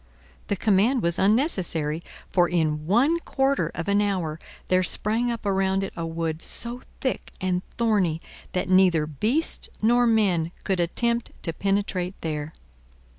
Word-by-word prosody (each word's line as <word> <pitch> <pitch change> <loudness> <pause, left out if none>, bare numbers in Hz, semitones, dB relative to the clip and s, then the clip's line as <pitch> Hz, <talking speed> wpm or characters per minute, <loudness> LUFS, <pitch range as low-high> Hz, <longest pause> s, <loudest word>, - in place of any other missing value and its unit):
The 200 - 0
command 215 +5 +2
was 170 0 +1
unnecessary, 185 - +1 0.3
for 175 -2 +4
in 155 -3 0
one 270 - +3
quarter 270 -3 0
of 165 - -4
an 200 +1 +3
hour 180 -6 -1 0.3
there 185 0 +3
sprang 220 +6 0
up 230 -2 -5
around 195 -1 +1
it 195 - -5
a 165 -1 -3
wood 165 -1 -3
so 240 +1 -4 0.2
thick 260 - -2
and 185 -2 0 0.2
thorny 205 -9 +2 0.3
that 180 - -1
neither 185 -4 +4
beasts 220 - -1
nor 240 +2 +4
men 185 -7 +2
could 190 -3 0
attempt 235 +7 0
to 165 - -2
penetrate 195 -1 -1
there. 155 -1 -3
190 Hz, 145 wpm, -25 LUFS, 170-225 Hz, 0.3 s, for